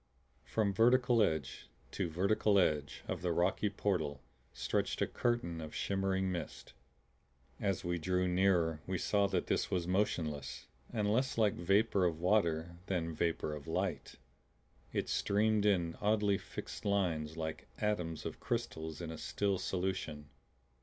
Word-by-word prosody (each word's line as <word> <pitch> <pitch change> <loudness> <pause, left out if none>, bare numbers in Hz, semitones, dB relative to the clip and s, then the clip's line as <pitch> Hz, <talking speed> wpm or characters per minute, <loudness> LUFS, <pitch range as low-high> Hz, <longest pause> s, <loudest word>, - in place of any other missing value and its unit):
From 105 -3 +1
vertical 120 +1 +4
edge 80 -9 -1 0.2
to 95 -4 -2
vertical 100 +4 +2
edge 75 -6 +1
of - - -3
the 90 -1 0
rocky 90 +5 +2
portal 85 -9 -1 0.3
stretched - - -1
a - - +3
curtain 105 -9 -1
of 80 -1 -7
shimmering 95 -1 0
mist. 85 -3 -6 0.9
As 100 -4 0
we 85 0 0
drew 90 +2 +1
nearer 90 -4 +2
we 95 0 -1
saw 100 +3 +2
that 95 -3 0
this - - 0
was 90 -2 0
motionless, 80 -8 -1 0.3
and 105 -3 +1
less 130 +2 +1
like 110 -2 +4
vapor 100 +3 +2
of 80 -2 0
water 85 -3 +1
than 85 -3 -1
vapor 80 -1 -1
of 75 +1 -8
light; 90 +1 -2 0.8
it - - -1
streamed 105 +1 +2
in 85 -5 +2
oddly 105 -1 +2
fixed - - -7
lines 85 -7 0
like 80 -1 -4
atoms 90 -7 -1
of - - -5
crystals 80 +1 -3
in 85 -1 -4
a 80 - -7
still 100 -2 0
solution. 90 -6 -3
90 Hz, 145 wpm, -34 LUFS, 80-100 Hz, 0.9 s, vertical